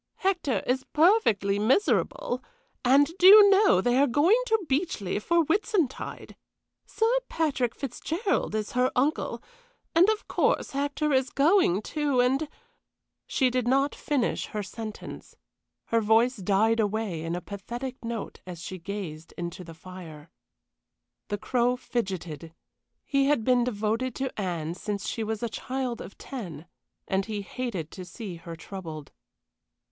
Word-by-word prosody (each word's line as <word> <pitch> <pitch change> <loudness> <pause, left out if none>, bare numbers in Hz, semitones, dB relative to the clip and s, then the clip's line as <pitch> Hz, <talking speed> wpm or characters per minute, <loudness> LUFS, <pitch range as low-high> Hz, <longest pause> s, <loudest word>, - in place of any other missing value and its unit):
Hector 350 - 0
is 260 +1 0
perfectly 230 - +3
miserable; 420 - +1 0.4
and, 285 +6 +4
do 365 - +7
you 405 0 +10
know, 390 - +5
they 245 +4 +2
are 285 - +4
going 330 - +4
to 445 -5 +1
Beechleigh 265 - -1
for 340 +8 +3
Whitsuntide. 360 - -1 0.5
Sir 445 - 0 0.2
Patrick 275 -7 0
Fitzgerald 315 - -2
is 215 -1 -2
her 250 +1 +2
uncle 285 +5 0 0.5
and, 350 +5 +6
of 435 -1 -1
course, - - +1
Hector 285 +1 -1
is 260 0 +2
going, 280 - +3
too, 290 -2 0
and 270 +5 +2 0.4
" - - -58
She 255 -2 +2
did 250 -1 0
not 275 +3 +2
finish 280 -5 -1
her 210 -1 -4
sentence. 215 +2 -8 0.5
Her 230 0 +1
voice 225 +4 +3
died 210 +4 +2
away 210 -5 -1
in 165 +1 -3
a - - -2
pathetic 240 +7 -7
note 230 -2 -5
as 175 -2 -7
she 185 +2 -7
gazed 170 -4 -7
into 175 +2 -5
the 165 -1 -11
fire. 165 -3 -11 1.0
The 205 - -2
Crow 245 +3 +1
fidgeted; 175 - -4 0.5
he 275 -1 +2
had 285 -6 +2
been 250 0 +3
devoted 230 +2 -1
to 265 -1 -3
Anne 170 -4 -2
since 200 +2 -4
she 225 - -2
was 220 +1 -3
a - - +1
child 255 +1 -4
of - - -10
ten, 180 - -7 0.4
and 190 +1 0
he 210 -2 -3
hated 195 -7 -4
to 185 - -8
see 180 0 -8
her 165 0 -8
troubled. 160 -4 -8
235 Hz, 145 wpm, -27 LUFS, 195-280 Hz, 1.0 s, you